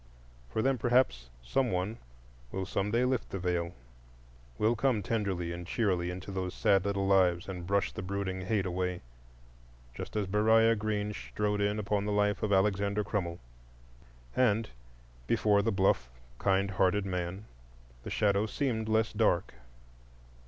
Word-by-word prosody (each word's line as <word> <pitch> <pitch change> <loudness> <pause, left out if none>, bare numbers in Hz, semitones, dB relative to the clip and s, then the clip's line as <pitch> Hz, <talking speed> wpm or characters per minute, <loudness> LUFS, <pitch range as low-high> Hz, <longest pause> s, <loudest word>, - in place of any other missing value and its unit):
For 110 - -1
them, 135 -2 +2
perhaps, 120 - +2
some 125 - +1
one 95 +5 -2 0.5
will 95 0 -3
some 100 +1 -1
day 120 +4 +2
lift 130 -1 -1
the - - -4
Veil,—will - - -4
come 115 -3 +1
tenderly 95 -6 -1
and 85 0 -6
cheerily 90 -6 0
into 95 +2 -6
those 95 -1 -3
sad 95 -1 +3
little 100 -1 0
lives 90 -3 +3
and 90 -3 -6
brush 100 +1 +1
the - - -6
brooding 95 0 -3
hate 100 -2 +1
away, 90 0 -2 0.9
just - - -7
as 105 -2 +1
Beriah 110 +3 +4
Green 105 -1 -2
strode 105 0 -2
in 105 +1 +1
upon 105 -1 -1
the 105 - -1
life 105 -1 +1
of 105 - -1
Alexander 100 +1 +2
Crummell. 90 -5 -2 1.0
And 115 -3 +2 0.6
before 105 -1 +3
the 115 +2 0
bluff, 95 - +2 0.3
kind 100 0 +2
hearted 95 +1 +2
man 90 +2 -3 0.6
the - - -7
shadow 100 +1 +2
seemed 110 -2 -1
less 110 0 +2
dark. 105 -5 +1
100 Hz, 145 wpm, -31 LUFS, 90-105 Hz, 1.0 s, Beriah